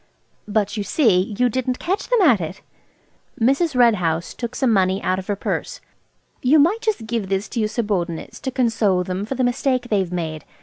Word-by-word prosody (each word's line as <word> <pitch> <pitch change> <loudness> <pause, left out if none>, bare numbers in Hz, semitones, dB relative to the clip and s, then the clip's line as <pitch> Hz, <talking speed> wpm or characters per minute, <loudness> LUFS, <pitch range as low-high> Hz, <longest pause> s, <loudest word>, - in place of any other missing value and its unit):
"But, 210 0 0
you 205 - -1
see, 205 - +2
you 250 - +3
didn't 255 +1 -1
catch 385 +4 -2
them 485 -3 +3
at 245 - +5
it." 170 +4 -6 0.8
Mrs. 275 +6 +2
Red 240 -2 +6
House 170 -3 -2
took 235 -1 -6
some 260 -4 +2
money 190 -1 +2
out 185 +1 0
of 185 - -9
her 205 - 0
purse. - - -3 0.6
"You 270 +5 +4
might 350 +10 +3
just 430 - -1
give 220 -4 -3
this 195 +1 -1
to 240 - -3
your 215 -1 +1
subordinates 195 -8 -3
to 270 - -3
console 225 -7 +1
them 185 +3 -4
for 270 - -3
the 260 - 0
mistake 250 0 0
they've 195 -4 0
made. 160 -4 -4
220 Hz, 200 wpm, -21 LUFS, 190-255 Hz, 0.8 s, Red